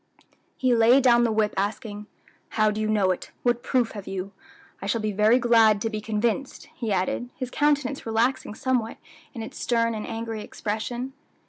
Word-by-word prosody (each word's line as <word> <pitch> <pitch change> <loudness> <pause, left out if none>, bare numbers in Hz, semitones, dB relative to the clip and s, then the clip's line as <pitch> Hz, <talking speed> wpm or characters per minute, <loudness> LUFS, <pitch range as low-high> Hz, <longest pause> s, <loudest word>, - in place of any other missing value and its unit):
He 255 -1 +2
laid 240 +3 +5
down 240 -2 +5
the 230 - +1
whip 215 -1 +1
asking, 210 +1 -3 0.5
"How 215 -1 +4
do 215 +1 -3
you 215 - 0
know 205 -3 +2
it? 180 - -4
what 240 -1 +2
proof 250 -2 +1
have 205 -3 -8
you? 195 0 -4 0.5
I 195 - -4
shall 230 +3 +1
be 215 -1 -1
very 210 +4 +4
glad 225 -4 +5
to 225 - -1
be 215 -1 -3
convinced," 220 +5 -2
he 230 -4 -4
added, 195 +6 -1
his 255 -2 -5
countenance 290 -2 +1
relaxing 230 0 0
somewhat 245 -3 -1 0.4
in 230 - -4
its - - -9
stern 230 -1 +1
and 215 -1 -5
angry 225 -1 -4
expression. 235 +6 -4
225 Hz, 185 wpm, -25 LUFS, 215-245 Hz, 0.5 s, laid